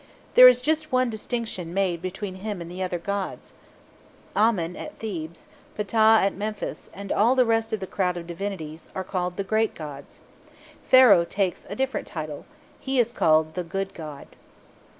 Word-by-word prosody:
There 255 - +10
is 250 0 +6
just 310 +2 0
one 255 -1 +2
distinction 220 -6 -4
made 185 -4 0
between 185 +1 -5
him 205 0 -5
and 170 0 -8
the 185 +1 -6
other 180 -1 -1
gods. 200 +2 -4 0.8
Amen 190 -6 +2
at 305 - -8
Thebes, 170 -7 -6 0.3
Ptah 220 +1 +4
at 200 - +1
Memphis, 210 +1 -5
and 200 0 -8
all 235 +5 +3
the 255 -1 +4
rest 225 -1 +1
of 220 - -1
the - - -3
crowd 180 -2 -1
of 170 - -6
divinities, 170 -3 -6
are 190 - -2
called 180 -1 -3
"the 200 - -1
great 220 +2 0
gods." 145 -3 -9 0.7
Pharaoh 250 -9 +7
takes 185 +2 -2
a - - -5
different 265 0 -2
title. 155 -3 -6 0.3
He 265 0 -2
is 240 -1 +2
called 155 -3 +3
"the 180 - -3
good 195 +3 -4
god." 150 -4 -8
195 Hz, 170 wpm, -25 LUFS, 175-225 Hz, 0.8 s, There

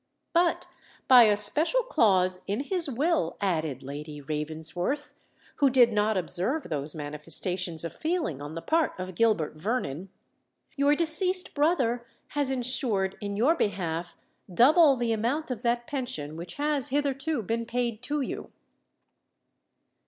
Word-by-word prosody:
"But, 345 0 +1 0.4
by 250 -3 +8
a 210 -1 +3
special 310 - +3
clause 185 - +4
in 205 +6 -1
his 335 +1 +1
will," 275 - 0
added 160 -9 -2
Lady 150 +2 -7
Ravensworth, 160 - -3 0.4
who 280 -2 +4
did 245 -3 +4
not 210 0 +1
observe 190 - -1
those 150 0 -4
manifestations 160 +3 -2
of 165 - -5
feeling 315 - -2
on 145 +2 -7
the 165 - -6
part 325 0 +1
of 185 0 -6
Gilbert 175 -7 +1
Vernon, 185 - -3 0.7
"your 285 +1 +3
deceased 360 +3 +2
brother 275 -6 +1 0.3
has 285 -2 +1
ensured 240 -7 0
in 200 -1 -4
your 260 +9 +4
behalf 175 - -3 0.3
double 285 - +5
the 235 -1 0
amount 255 +7 -2
of 235 -3 -4
that 240 0 0
pension 245 - -4
which 170 +1 -7
has 290 -2 -1
hitherto 280 -1 -1
been 230 +3 -3
paid 235 -2 -2
to 290 +4 -2
you." 265 - -6
230 Hz, 135 wpm, -27 LUFS, 175-285 Hz, 0.7 s, by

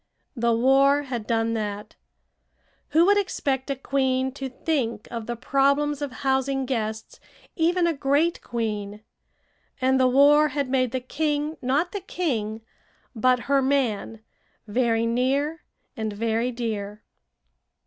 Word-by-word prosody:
The 235 -1 +1
war 270 +4 +4
had 240 -5 -5
done 225 0 +1
that. 210 -1 -4 0.9
Who 330 +2 +4
would 405 +1 +5
expect 275 -9 -2
a 275 - 0
queen 265 -1 0
to 270 0 -6
think 250 -5 -2
of 230 -2 -5
the 240 - -3
problems 280 +4 +1
of 285 -2 -3
housing 265 0 +1
guests, 220 -4 -4 0.4
even 345 +2 +2
a 340 - +2
great 290 +4 +1
queen? 210 -3 -4 0.8
And 260 0 +2
the 255 - +5
war 290 +4 +5
had 285 -2 -2
made 255 -2 +1
the 260 - -2
king 295 +3 -2
not 280 +7 0
the 405 - -4
king, 230 - -3 0.5
but 250 +2 +2
her 275 +1 +2
man, 245 -5 0 0.5
very 230 +1 +1
near 275 +7 0 0.3
and 220 -1 -3
very 230 +3 -1
dear. 215 -3 -4
260 Hz, 135 wpm, -25 LUFS, 230-285 Hz, 0.9 s, would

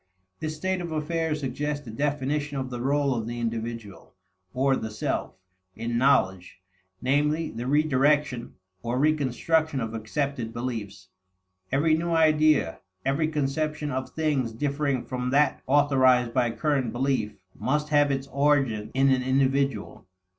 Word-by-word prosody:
This 155 0 -3
state 185 +3 -1
of 170 -1 -5
affairs 155 0 -1
suggests 145 +2 -3
a 115 - -7
definition 145 +2 -1
of 130 -1 -4
the 120 -1 -4
role 140 +1 +1
of 115 -2 -3
the 120 0 -4
individual, 115 -2 -5 0.4
or 135 +3 +2
the 110 - -4
self, 105 - -3 0.4
in 115 0 -3
knowledge; 95 -9 +2 0.4
namely, 150 +4 +1
the 120 +2 -5
redirection, 145 -3 +2 0.3
or 120 +4 -2
reconstruction 155 +1 +1
of 115 -2 -3
accepted 115 +2 -3
beliefs. 105 -6 -5 0.6
Every 150 +4 +3
new 170 +2 -2
idea, 155 - +3 0.3
every 140 +3 +1
conception 150 0 -2
of 130 0 -3
things 145 -7 -1
differing 140 0 -1
from 125 -1 -3
that 140 +1 +2
authorized 130 -4 +4
by 125 -1 +2
current 135 -1 0
belief, 120 -4 -1 0.2
must 150 +3 -1
have 145 -1 +4
its 135 -1 -1
origin 135 -7 +1
in 135 0 +4
an 130 -1 +2
individual. 135 -5 0
135 Hz, 140 wpm, -26 LUFS, 120-150 Hz, 0.6 s, authorized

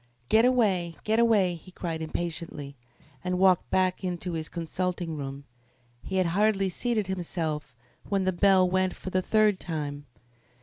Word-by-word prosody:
"Get 225 +2 +5
away! 195 -10 +2
Get 220 +1 +2
away!" 210 -6 +4
he 170 +1 -11
cried 170 -3 -4
impatiently, 160 -3 -4 0.5
and 180 0 -1
walked 185 -1 +4
back 185 0 +1
into 180 0 -3
his 160 -1 -3
consulting 175 0 -3
room. 140 -1 -6 0.6
He 190 - -5
had 185 -1 +3
hardly 200 -1 +2
seated 220 +3 -1
himself 165 -7 -3 0.3
when 195 -2 +1
the 185 0 +1
bell 190 0 +5
went 185 0 +1
for 185 - -7
the 185 - +2
third 210 -1 +3
time. 145 -3 -5
180 Hz, 155 wpm, -27 LUFS, 165-195 Hz, 0.6 s, Get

